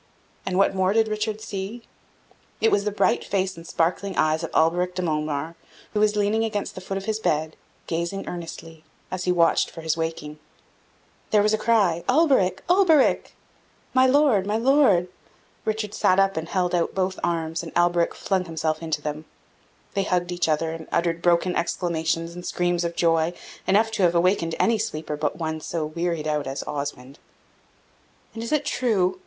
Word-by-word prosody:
And 185 Hz, -1 st, 0 dB
what 195 Hz, 0 st, +3 dB
more 190 Hz, 0 st, +1 dB
did 225 Hz, 0 st, +3 dB
Richard 215 Hz, 0 st, -2 dB
see? 205 Hz, +4 st, -5 dB, 0.8 s
It 225 Hz, -, +3 dB
was 200 Hz, 0 st, +2 dB
the 210 Hz, -, 0 dB
bright 205 Hz, -, +1 dB
face 190 Hz, -1 st, -1 dB
and 165 Hz, 0 st, -11 dB
sparkling 185 Hz, +3 st, -1 dB
eyes 155 Hz, +1 st, +2 dB
of 165 Hz, -, -3 dB
Alberic 175 Hz, +3 st, +2 dB
de 185 Hz, -, -2 dB
Montemar, 155 Hz, -1 st, -2 dB, 0.4 s
who 210 Hz, -, 0 dB
was 210 Hz, 0 st, +3 dB
leaning 210 Hz, +2 st, +1 dB
against 210 Hz, -2 st, -2 dB
the 185 Hz, -, -8 dB
foot 195 Hz, +1 st, -4 dB
of 195 Hz, -, -5 dB
his 220 Hz, +1 st, -1 dB
bed, 155 Hz, -5 st, -1 dB, 0.3 s
gazing 170 Hz, +4 st, -3 dB
earnestly, 165 Hz, -2 st, -8 dB, 0.3 s
as 185 Hz, -1 st, -3 dB
he 180 Hz, -, +2 dB
watched 170 Hz, -2 st, +3 dB
for 165 Hz, -, -10 dB
his 160 Hz, 0 st, 0 dB
waking. 160 Hz, -2 st, -4 dB, 0.9 s
There 210 Hz, -1 st, +4 dB
was 215 Hz, +1 st, +2 dB
a -, -, +3 dB
cry 200 Hz, -8 st, +2 dB
"Alberic! 255 Hz, -, +3 dB
Alberic!" 350 Hz, -6 st, +3 dB, 0.6 s
"My 260 Hz, 0 st, +5 dB
Lord! 260 Hz, -8 st, +3 dB
my 210 Hz, +1 st, +1 dB
Lord!" 235 Hz, -8 st, +4 dB, 0.6 s
Richard 215 Hz, -1 st, -2 dB
sat 185 Hz, +1 st, +3 dB
up 195 Hz, 0 st, +3 dB
and 160 Hz, +1 st, -4 dB
held 180 Hz, -2 st, 0 dB
out 170 Hz, -1 st, 0 dB
both 185 Hz, 0 st, -1 dB
arms, 165 Hz, -1 st, -1 dB
and 165 Hz, -, -8 dB
Alberic 175 Hz, -1 st, +2 dB
flung 190 Hz, -2 st, -1 dB
himself 160 Hz, -1 st, -2 dB
into 155 Hz, -2 st, -3 dB
them. 150 Hz, +1 st, -4 dB, 0.7 s
They 200 Hz, -, +1 dB
hugged 180 Hz, -2 st, 0 dB
each 175 Hz, -2 st, 0 dB
other, 160 Hz, +1 st, +1 dB
and 165 Hz, -1 st, -8 dB
uttered 170 Hz, -1 st, 0 dB
broken 175 Hz, +1 st, +2 dB
exclamations 165 Hz, -1 st, -1 dB
and 175 Hz, 0 st, -8 dB
screams 175 Hz, -1 st, 0 dB
of 170 Hz, 0 st, -3 dB
joy, 165 Hz, 0 st, +2 dB, 0.3 s
enough 220 Hz, +3 st, +3 dB
to 220 Hz, -, -2 dB
have 175 Hz, -1 st, +3 dB
awakened 170 Hz, -1 st, +2 dB
any 230 Hz, -1 st, +3 dB
sleeper 155 Hz, -8 st, -3 dB
but 150 Hz, -1 st, -2 dB
one 160 Hz, -1 st, -3 dB
so 160 Hz, 0 st, -3 dB
wearied 165 Hz, 0 st, -2 dB
out 150 Hz, -2 st, -1 dB
as 135 Hz, +1 st, -4 dB
Osmond. 140 Hz, -1 st, -6 dB, 1.1 s
"And 225 Hz, -, -6 dB
is 230 Hz, -, -5 dB
it 300 Hz, -2 st, +1 dB
true? 190 Hz, -7 st, +1 dB
175 Hz, 180 wpm, -24 LUFS, 165-205 Hz, 1.1 s, My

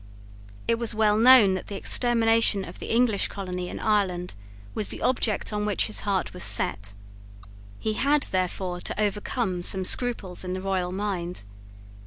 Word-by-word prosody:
It 230 Hz, 0 st, +1 dB
was 235 Hz, -2 st, +1 dB
well 215 Hz, -1 st, +2 dB
known 230 Hz, -3 st, +7 dB
that 185 Hz, -, -5 dB
the 200 Hz, -, -7 dB
extermination 225 Hz, -2 st, +2 dB
of 170 Hz, -, -11 dB
the -, -, -7 dB
English 230 Hz, -3 st, +2 dB
colony 180 Hz, -2 st, -6 dB
in -, -, -7 dB
Ireland 190 Hz, -5 st, -1 dB, 0.4 s
was 210 Hz, -, -1 dB
the -, -, -4 dB
object 225 Hz, -4 st, 0 dB
on 210 Hz, 0 st, -2 dB
which 210 Hz, -1 st, 0 dB
his 215 Hz, -, -2 dB
heart 195 Hz, -2 st, -2 dB
was 180 Hz, -, -3 dB
set. 100 Hz, 0 st, 0 dB, 0.8 s
He 215 Hz, -, -2 dB
had, 285 Hz, +5 st, +1 dB
therefore, 185 Hz, -1 st, -2 dB
to -, -, -4 dB
overcome 205 Hz, -2 st, -2 dB
some 190 Hz, +1 st, +3 dB
scruples 205 Hz, -6 st, 0 dB
in 180 Hz, 0 st, -4 dB
the 185 Hz, -, -4 dB
royal 185 Hz, -2 st, -2 dB
mind. 185 Hz, -, -4 dB
200 Hz, 165 wpm, -25 LUFS, 185-225 Hz, 0.8 s, known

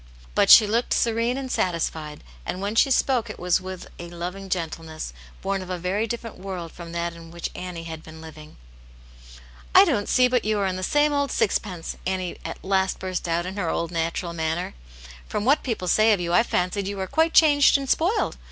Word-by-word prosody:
But -, -, +3 dB
she 215 Hz, -, +10 dB
looked 230 Hz, +4 st, 0 dB
serene 230 Hz, +2 st, +1 dB
and 265 Hz, -2 st, -5 dB
satisfied, 160 Hz, -4 st, -2 dB, 0.2 s
and 180 Hz, -, -4 dB
when 200 Hz, +2 st, -2 dB
she 225 Hz, -, +4 dB
spoke 250 Hz, -3 st, +2 dB
it 215 Hz, -, -7 dB
was 180 Hz, +1 st, +1 dB
with 185 Hz, -1 st, -7 dB
a 170 Hz, 0 st, -7 dB
loving 180 Hz, +3 st, -6 dB
gentleness 160 Hz, -, -4 dB, 0.3 s
born 195 Hz, 0 st, -1 dB
of 185 Hz, -, -9 dB
a 180 Hz, -, -2 dB
very 190 Hz, +6 st, -1 dB
different 230 Hz, -2 st, -6 dB
world 185 Hz, -3 st, -6 dB
from 170 Hz, -1 st, -10 dB
that 170 Hz, 0 st, -2 dB
in 165 Hz, -1 st, -12 dB
which 170 Hz, 0 st, -5 dB
Annie 180 Hz, -2 st, -6 dB
had 160 Hz, -1 st, -7 dB
been 160 Hz, 0 st, -12 dB
living. 155 Hz, -1 st, -12 dB, 0.6 s
" -, -, -19 dB
I -, -, +10 dB
don't 205 Hz, -, 0 dB
see 255 Hz, -1 st, +5 dB
but 250 Hz, -2 st, +1 dB
you 215 Hz, 0 st, 0 dB
are 195 Hz, -2 st, 0 dB
the 185 Hz, -, -5 dB
same 295 Hz, +8 st, +2 dB
old 285 Hz, -1 st, +1 dB
sixpence 185 Hz, -4 st, -1 dB
!" -, -, -6 dB
Annie 185 Hz, -1 st, -3 dB
at -, -, -7 dB
last 190 Hz, -1 st, +1 dB
burst 185 Hz, -2 st, -4 dB
out 170 Hz, +1 st, 0 dB
in 190 Hz, +2 st, -6 dB
her 175 Hz, -5 st, -1 dB
old 170 Hz, 0 st, -2 dB
natural 170 Hz, +1 st, -2 dB
manner. 160 Hz, +1 st, -2 dB, 0.3 s
" -, -, -16 dB
From 205 Hz, -, -2 dB
what 280 Hz, +4 st, +4 dB
people 225 Hz, -8 st, -3 dB
say 215 Hz, +4 st, +5 dB
of 200 Hz, -, 0 dB
you 170 Hz, -1 st, -2 dB
I 230 Hz, -, +6 dB
fancied 190 Hz, -2 st, -1 dB
you 200 Hz, 0 st, -4 dB
were 190 Hz, -, -2 dB
quite 320 Hz, -, +1 dB
changed 290 Hz, -3 st, +6 dB
and 275 Hz, -1 st, -5 dB
spoiled. 370 Hz, -, +1 dB
185 Hz, 215 wpm, -24 LUFS, 170-215 Hz, 0.6 s, she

